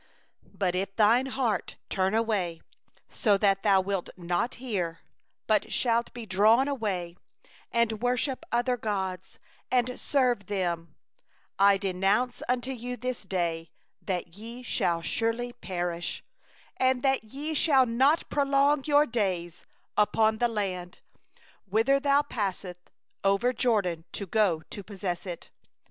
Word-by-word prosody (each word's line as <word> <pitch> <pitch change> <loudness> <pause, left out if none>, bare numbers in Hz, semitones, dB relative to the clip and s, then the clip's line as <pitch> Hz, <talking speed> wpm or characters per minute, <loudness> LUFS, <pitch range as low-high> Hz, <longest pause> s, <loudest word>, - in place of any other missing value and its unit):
17But 185 -3 +1
if 195 +2 -2
thy 225 +3 +5
heart 255 -5 -1
turn 190 +1 0
away, 205 -7 0 0.6
and 205 -3 +4 0.2
thou 195 -2 +4
wilt 190 -1 -2
not 175 +7 -1
hear, 185 -10 -3 0.4
but 215 -2 +1
shalt 235 -1 +1
be 240 -2 -8
drawn 215 +7 +4
away, 195 -11 -2 0.6
and 230 -2 +1
worship 250 +2 0
other 245 +1 +1
gods, 190 -4 -3 0.3
and 250 0 +1
serve 250 -8 +1
them; 170 -5 -2 0.6
18I 200 0 +6
declare 195 +5 +1 0.2
unto 250 +1 0
you 250 0 -5
this 250 +1 -3
day, 170 -4 -2 0.3
that 180 -3 -4
ye 230 +4 -9
shall 170 -7 0
surely 230 +4 -1
perish; 175 -6 -4 1.0
ye 280 +8 -5
shall 280 -4 +4
not 265 +7 +2
prolong 280 0 +3
your 295 0 +5
days 185 - -2 0.3
upon 220 +1 +3
the 240 - +3
land, 190 -4 -4 0.6
whither 225 +8 +3
thou 285 0 +3
passest 190 -8 -4 0.3
over 195 +5 +3
the - - -1
Jordan 190 -9 +1
to 200 - -3
go 190 -4 +2
in - - -23
to 205 - -6
possess 190 -2 -4
it. 175 -2 -7
215 Hz, 125 wpm, -28 LUFS, 185-245 Hz, 1.0 s, 18I